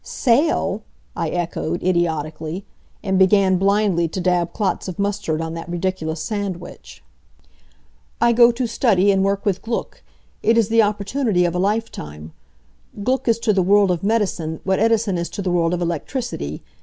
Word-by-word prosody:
"Sail!" 275 +6 +1 0.3
I - - -2
echoed, 175 -1 -3
idiotically; 165 0 -1 0.4
and 190 -2 +1
began 190 -1 +4
blindly 195 -3 +2
to 165 - -5
dab 175 -1 +1
clots 205 -2 -2
of 185 - -6
mustard 200 -6 -1
on 165 0 -4
that 165 0 -7
ridiculous 170 -3 -2
sandwich. 175 - -6 1.2
"I 235 +1 +4
go 235 +1 +6
to 245 +2 -2
study 215 -4 +2
and 190 -1 +2
work 200 0 0
with 200 -3 0
Gluck. 230 +1 -4 0.4
It 230 +1 +3
is 225 -2 +3
the 230 0 +5
opportunity 205 -1 0
of 170 - 0
a 180 - -1
lifetime. 130 - -3 0.7
Gluck 260 +3 0
is 230 -1 +3
to 215 - +2
the 190 - +2
world 200 +1 +4
of 175 -2 -1
medicine 190 -7 -1
what 190 0 +1
Edison 220 -4 +2
is 170 -1 -3
to 185 - -5
the 180 - -1
world 170 -1 +2
of 175 0 -1
electricity. 170 - -4
190 Hz, 165 wpm, -21 LUFS, 170-215 Hz, 1.2 s, go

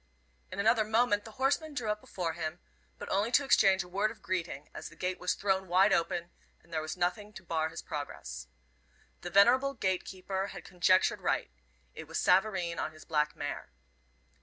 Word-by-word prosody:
In 185 - -6
another 220 +2 +4
moment 220 -1 +2
the 220 - -10
horseman 285 +3 +1
drew 225 -5 -1
up 210 0 -3
before 170 -3 -3
him, 160 +2 -4 0.4
but - - -7
only 200 +4 +1
to 285 - +5
exchange 195 -7 +5
a - - -13
word 200 +4 0
of 220 - -12
greeting, 170 -6 -3
as - - -7
the - - -16
gate 185 0 -2
was 180 - 0
thrown 190 -1 0
wide 190 +3 +5
open, 170 +1 0 0.3
and 170 - -17
there 160 - 0
was 155 +3 -5
nothing 180 +4 -1
to - - -10
bar 160 -2 -1
his 165 - -8
progress. 65 - -6 0.7
The 175 - -5
venerable 250 +9 +5
gate 185 -5 0
keeper 190 +1 -4
had - - -9
conjectured 185 +1 +3
right. - - 0 0.4
It - - -9
was - - -4
Savareen 180 -3 +2
on - - -2
his 155 - -14
black 150 -1 0
mare. 145 - -5
185 Hz, 190 wpm, -31 LUFS, 170-210 Hz, 0.7 s, to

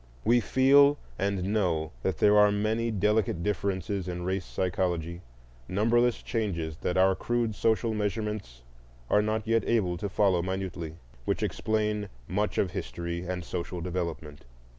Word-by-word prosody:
We 120 +2 +5
feel 140 +4 +5 0.2
and 100 -2 0
know 85 -7 0
that 95 -4 -1
there 105 0 +5
are 105 0 +6
many 110 +3 0
delicate 105 -4 +1
differences 100 -1 -2
in 90 -1 -4
race 95 0 -1
psychology, 85 -2 -2 0.5
numberless 115 +5 +2
changes 85 -9 -2
that 90 - -2
our 95 +1 +5
crude 120 +3 -1
social 110 +2 +1
measurements 105 - -3 0.5
are 105 - +5
not 110 +1 -1
yet 115 0 +2
able 95 -7 +1
to 100 +3 -3
follow 95 -3 +2
minutely, 90 -3 -4 0.3
which - - -1
explain 105 -2 -1 0.2
much 105 +3 -1
of 95 - +1
history 85 +7 -4
and 90 -1 -4
social 85 +1 -4
development. 85 -4 -4
100 Hz, 140 wpm, -28 LUFS, 90-110 Hz, 0.5 s, are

